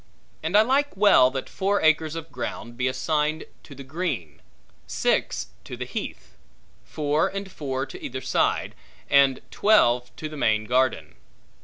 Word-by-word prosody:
And 165 +6 +2
I 215 - +7
like 270 0 +1
well 195 -11 +6
that 130 0 -5
four 200 +1 0
acres 155 0 +3
of 165 0 -7
ground 120 -1 -6
be 125 +2 0
assigned 155 +3 0 0.2
to 140 - -13
the 135 - -9
green; 130 - -4 0.5
six - - 0 0.2
to - - -7
the - - -4
heath; - - -7 0.5
four 150 +1 0
and 195 -1 -6
four 135 -4 -3
to - - -11
either 130 - -4
side; 130 - 0 0.4
and 140 -2 +5
twelve 125 - +3
to 155 - -5
the 155 - -9
main 110 -5 +1
garden. 130 +2 0
150 Hz, 155 wpm, -25 LUFS, 130-170 Hz, 0.5 s, I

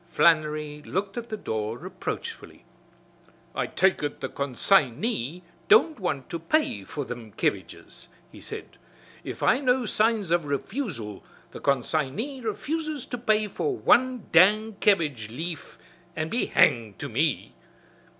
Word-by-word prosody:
Flannery 155 -3 +2
looked 195 +4 -3
at 235 -1 -5
the 215 - -3
door 110 - -3
reproachfully. - - -6 0.9
"I - - -1
take 190 +1 +2
ut 145 -1 -3
the - - -4
con 140 -3 -4
sign 135 -8 +3
y 180 - -2 0.2
don't 335 - +5
want 155 -9 -2
to 170 - -3
pay 165 - 0
for 145 +7 -5
thim 120 -3 -7
kebbages," - - -3 0.2
he - - -13
said. - - -9 0.5
"If - - -6
I 250 - +4
know 255 -2 +2
signs 215 -4 +1
of 170 -2 +2
refusal, 140 - -4 0.3
the - - -8
con 140 -3 +2
sign 140 -2 -1
y 265 +3 -4
refuses 300 +6 -3
to 245 - -5
pay 215 -2 +2
for 390 - -2
wan 255 - +3
dang 210 +6 +5
kebbage 150 - +2
leaf 160 +7 -6 0.4
an' 155 0 -2
be 235 - 0
hanged 110 -4 +3
to - - -5
me!" 140 +4 0
170 Hz, 150 wpm, -26 LUFS, 140-230 Hz, 0.9 s, don't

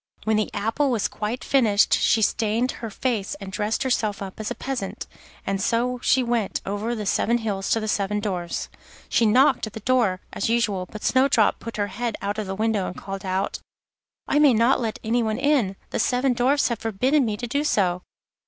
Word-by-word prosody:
When 220 0 +1
the 215 - 0
apple 225 +8 0
was 230 -5 +1
quite 220 +4 -4
finished 220 -7 +3
she 220 - +3
stained 225 +4 +1
her 225 - -4
face 215 -2 -2
and 195 -1 -9
dressed 210 +4 -1
herself 225 -5 0
up 195 0 -7
as 215 - -3
a - - -4
peasant, 255 -8 -4 0.4
and 195 0 -1
so 245 +4 0
she 260 - +3
went 235 -4 -1
over 210 +4 -2
the 215 -2 -4
seven 235 +4 +2
hills 205 -4 -3
to 225 - +3
the 215 - -4
seven 210 0 0
Dwarfs'. 180 -5 -3 0.4
She 230 - +3
knocked 250 +2 +4
at 215 - -10
the - - -6
door, 225 -6 +2
as 200 - -1
usual, 210 -6 0
but 215 - -9
Snowdrop 260 -4 +3
put 230 -1 -7
her 205 - +1
head 235 +1 -2
out 205 +2 -3
of 210 - -3
the 190 - -3
window 215 -2 0
and - - -7
called 195 0 -6
out: 190 +1 -1 0.7
'I 295 - +2
may 290 -4 +6
not 235 +5 +3
let 225 -2 -2
anyone 225 -1 0
in, 265 -8 +2 0.2
the - - -2
seven 250 +1 +2
Dwarfs 255 +4 +2
have 235 -2 -2
forbidden 255 +7 +1
me 215 -3 -1
to 245 - -4
do 280 +5 -1
so. 180 -10 +1
220 Hz, 205 wpm, -24 LUFS, 205-245 Hz, 0.7 s, may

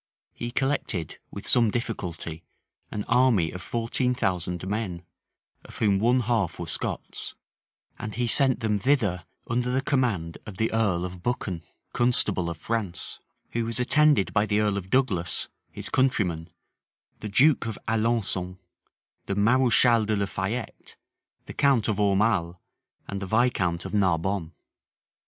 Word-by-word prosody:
He 120 - -5
collected, 120 - -2
with - - -8
some 115 -3 +4
difficulty, 90 -8 -4 0.5
an 105 - -4
army 115 -11 +3
of 90 - -7
fourteen 120 +2 0
thousand 90 -4 -2
men, 95 -4 -3 0.6
of - - -12
whom 100 -3 +2
one 120 +4 +3
half 110 -7 0
were - - -5
Scots; - - -3 0.6
and 110 - -5
he 120 +1 0
sent 130 +2 +3
them 105 -2 0
thither 105 -8 +1 0.2
under 120 +1 0
the 130 +1 +1
command 115 - 0
of 100 -3 -8
the 110 +1 0
earl 100 -6 +1
of 90 -1 -8
Buchan, 95 -6 -2 0.3
constable 110 -7 +4
of 85 - -5
France; 105 -1 -3 0.3
who 115 - 0
was 115 +2 -3
attended 145 -3 +4
by 105 0 +2
the 105 0 +1
earl 105 -1 +1
of 95 -2 -5
Douglas, 105 -10 +1 0.2
his - - -4
countryman, 95 -11 0 0.7
the 105 - -5
duke 130 +4 +4
of 110 - -4
Alençon, 110 -5 0 0.7
the 100 - -1
mareschal 115 0 +4
de 110 - +1
la 100 0 0
Fayette, 95 +5 -5 0.5
the - - -8
count 135 -6 +2
of 110 -3 0
Aumale, 100 -4 +2 0.5
and 100 0 -5
the 95 - -4
viscount 95 -7 +1
of - - -6
Narbonne. 95 -2 0
105 Hz, 145 wpm, -26 LUFS, 95-120 Hz, 0.7 s, some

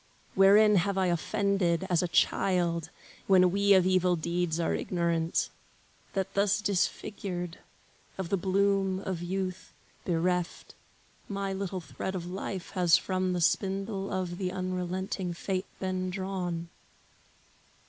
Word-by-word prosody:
Wherein 205 +2 +6
have 195 +2 +1
I 190 - +2
offended, 190 0 +1
as 175 -3 +2
a 180 - 0
child, 170 -2 +1 0.4
When 185 -2 +5
we 200 +1 +4
of 185 -1 +4
evil 185 -1 +3
deeds 170 0 -1
are 165 - +1
ignorant, 170 -2 0 0.6
That 195 -1 -2
thus 200 0 +2
disfigured, 185 -3 -2 0.6
of 190 -3 -4
the 195 - +2
bloom 195 0 +1
of 185 -4 -4
youth 185 +1 -4 0.3
Bereft, 180 0 -1 0.6
my 200 -1 -2
little 190 -1 -3
thread 190 +3 -5
of 175 -2 -4
life 185 0 -5
has 175 -4 +4
from 185 -1 -1
The 175 - -1
spindle 195 +3 0
of 180 -2 -3
the 185 -2 -1
unrelenting 185 0 -3
Fate 190 +2 -3
Been 185 -1 -2
drawn? 180 -3 -3
185 Hz, 130 wpm, -29 LUFS, 175-195 Hz, 0.6 s, Wherein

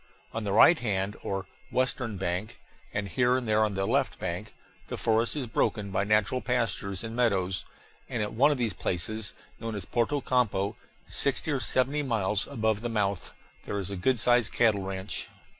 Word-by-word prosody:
On 115 - -3
the 100 - -1
right 140 - +7
hand, 100 -3 -1
or 95 0 -3 0.3
western 125 -4 0
bank, 90 +2 -3 0.3
and 105 -1 -2
here 125 +6 +2
and 125 -3 -3
there 110 0 +4
on 105 -2 0
the 95 0 0
left - - +1
bank, - - -4 0.4
the - - -4
forest 115 +3 +2
is 140 -4 -1
broken 105 -3 0
by 95 +1 +1
natural 105 +4 +2
pastures 115 -6 -1
and 115 0 -5
meadows, 95 -6 +1 0.4
and 115 - -1
at 105 - -4
one 135 +6 +5
of 145 - +1
these 115 -4 0
places, 100 +4 -2 0.3
known 115 -1 -4
as 100 - -5
Porto 120 +5 +1
Campo, 110 -7 +1 0.3
sixty 140 +3 +1
or 140 - +1
seventy 130 +4 +2
miles 110 -6 0
above 110 -5 0
the 120 - -2
mouth, 100 -4 -1 0.3
there 100 - -2
is 95 0 -4
a - - -3
good 120 +7 +1
sized 120 -1 +4
cattle 110 -4 +3
ranch. 95 -1 -3
110 Hz, 185 wpm, -28 LUFS, 100-125 Hz, 0.4 s, right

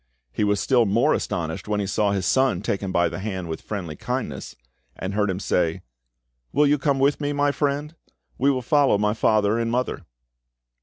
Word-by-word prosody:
He 105 - -1
was 105 -1 +2
still 120 -4 +3
more 120 +10 +3
astonished 80 +1 -3
when 105 -1 0
he 100 - -1
saw 100 +1 +1
his 95 -2 -1
son 130 -2 +2
take 100 - -1
him 95 -2 -3
by 85 -1 +3
the 80 +1 -5
hand 95 -3 -4
with 80 -1 -5
friendly 90 -7 -5
kindness, - - -4 0.4
and 95 +2 -5
heard 105 0 +1
him 95 0 -2
say— 85 -4 0 0.7
"Will 150 +1 +3
you 145 0 +3
come 140 0 +1
with 140 +2 +2
me, 145 0 -1
my 145 0 +2
friend? 145 +2 -1 0.5
We 140 - +3
will 130 -2 0
follow 140 -4 +3
my 105 +1 +1
father 110 0 +2
and 115 0 -1
mother." 125 +2 -1
105 Hz, 200 wpm, -24 LUFS, 95-135 Hz, 0.7 s, still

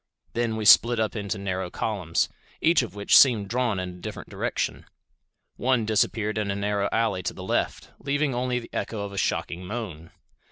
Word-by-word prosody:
Then 115 -1 0
we 110 -1 -3
split 115 +2 +7
up 110 0 0
into 105 0 -3
narrow 95 -2 -3
columns, 90 -5 -1 0.3
each 165 -1 +4
of 120 -4 -6
which 100 0 +3
seemed 110 -7 +6
drawn 120 -4 0
in 90 0 -3
a 90 0 -11
different - - -7
direction. - - -3 0.7
One 125 -3 +1
disappeared 110 0 +1
in 105 -2 -2
a 100 - -1
narrow 100 0 0
alley 110 -5 +1
to - - -4
the - - -8
left, - - -2
leaving 145 0 0
only 125 0 -1
the 120 - -8
echo 110 -3 -3
of 100 -1 -5
a - - -7
shocking 90 0 -2
moan. 90 -6 -6
105 Hz, 190 wpm, -26 LUFS, 100-120 Hz, 0.7 s, split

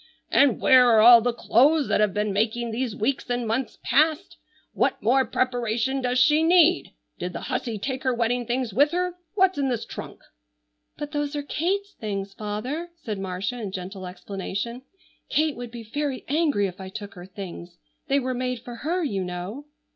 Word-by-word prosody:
"And 280 -5 +4
where 255 -2 +6
are 225 -2 +6
all 235 +1 +9
the 245 +2 +1
clothes 275 +6 +3
that - - +2
have 210 -1 +3
been 210 +1 -1
making 225 +3 0
these 235 -1 -2
weeks 250 +5 -1
and 245 -1 -1
months 230 +3 -2
past? 305 +7 +2 0.4
What - - +1
more 260 +5 +3
preparation 245 +1 0
does 250 0 0
she 300 +4 +5
need? 345 +1 +4 0.3
Did 180 +1 -4
the - - -5
hussy 245 -4 -3
take 260 +5 -3
her 260 - +1
wedding 240 0 0
things 245 -3 -1
with 285 +7 +4
her? 360 0 0 0.2
What's 380 -5 +3
in 275 -1 +1
this 240 -3 -2
trunk?" - - -9 0.8
"But 295 0 -5
those 290 -1 -2
are 290 - -2
Kate's 390 +7 -2
things, 200 -2 -5
father," 245 - -4
said 210 -4 -4
Marcia 195 +6 -3
in 200 -3 -4
gentle 185 0 -6
explanation. 200 +5 -5 0.5
"Kate 310 -1 +1
would 245 -1 -7
be 235 0 -8
very 275 +4 -3
angry 290 -8 +2
if 190 0 -6
I 190 - -7
took 205 0 -8
her 180 0 -11
things. 180 -2 -9 0.3
They 280 -1 +3
were 255 -1 -2
made 250 -1 -3
for 240 -1 -8
her, 340 +8 -1
you 200 -10 -1
know." 180 +10 -6
245 Hz, 185 wpm, -25 LUFS, 210-280 Hz, 0.8 s, all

